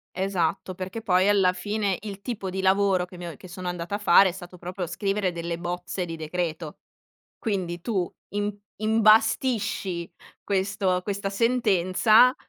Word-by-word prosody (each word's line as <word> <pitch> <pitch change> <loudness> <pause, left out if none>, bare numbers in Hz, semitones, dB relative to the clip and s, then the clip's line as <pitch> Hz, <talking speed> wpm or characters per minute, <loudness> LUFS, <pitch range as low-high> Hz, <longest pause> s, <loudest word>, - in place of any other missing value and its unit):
Esatto, 185 -1 -1
perché, 190 +5 -5
poi 185 -1 +3
alla 190 -3 +4
fine, 205 0 -1
il 200 -2 -7
tipo 200 -5 -4
di 190 +1 -3
lavoro 190 -1 +3
che 180 - -14
mi 175 -1 -6
o 165 - -7
che - - -12
sono 180 0 -5
andata 175 +3 -3
a - - -1
fare, 195 -1 +6
è - - 0
stato 180 -1 -10
proprio 180 +1 -5
scrivere 195 +2 -1
delle 170 0 -4
bozze 175 +1 -4
di 165 -1 -6
decreto. 160 -1 -4 0.6
Quindi, 185 -6 -2
tu 190 -6 -1 0.2
im 205 0 -1 0.3
imbastisci 215 -4 +2 0.4
questo 195 -1 0
questa 200 -1 -2
sentenza 220 +1 +4
190 Hz, 155 wpm, -26 LUFS, 180-205 Hz, 0.6 s, fare